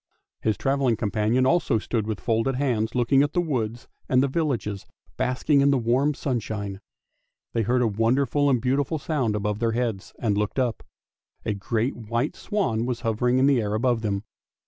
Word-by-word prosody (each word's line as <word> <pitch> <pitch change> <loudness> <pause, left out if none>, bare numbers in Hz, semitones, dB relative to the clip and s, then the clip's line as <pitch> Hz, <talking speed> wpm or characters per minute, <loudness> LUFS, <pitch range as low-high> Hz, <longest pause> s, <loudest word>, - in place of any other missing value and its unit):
" - - -60
His 110 -1 0
travelling 135 -3 +1
companion 110 +3 +1
also 150 -5 +2
stood 110 0 -2
with 110 -2 -3
folded 115 +3 0
hands 120 -4 0
looking 125 +3 +4
at 145 +1 0
the - - +2
woods 120 -8 -2 0.2
and 130 0 +4
the - - +2
villages 130 - -2 0.3
basking 140 +3 +2
in 140 - +4
the 140 - +3
warm 130 +5 +1
sunshine. 105 -7 -3 0.7
They 115 - +1
heard 125 +3 +2
a - - +3
wonderful 130 +7 +2
and 130 -3 +3
beautiful 135 +5 0
sound 135 -8 -1
above 105 0 -2
their 115 -1 +1
heads, 115 -5 -2
and 105 -4 0
looked 105 +3 -1
up; 125 -3 0 0.6
a 110 - 0
great 115 +5 -1
white 115 +4 -2
swan 120 - -1
was 125 -2 -2
hovering 120 +2 +1
in 130 - +4
the 135 -4 +4
air 105 0 -1
above 120 +1 +1
them. 100 -2 -2
120 Hz, 185 wpm, -25 LUFS, 110-135 Hz, 0.7 s, looking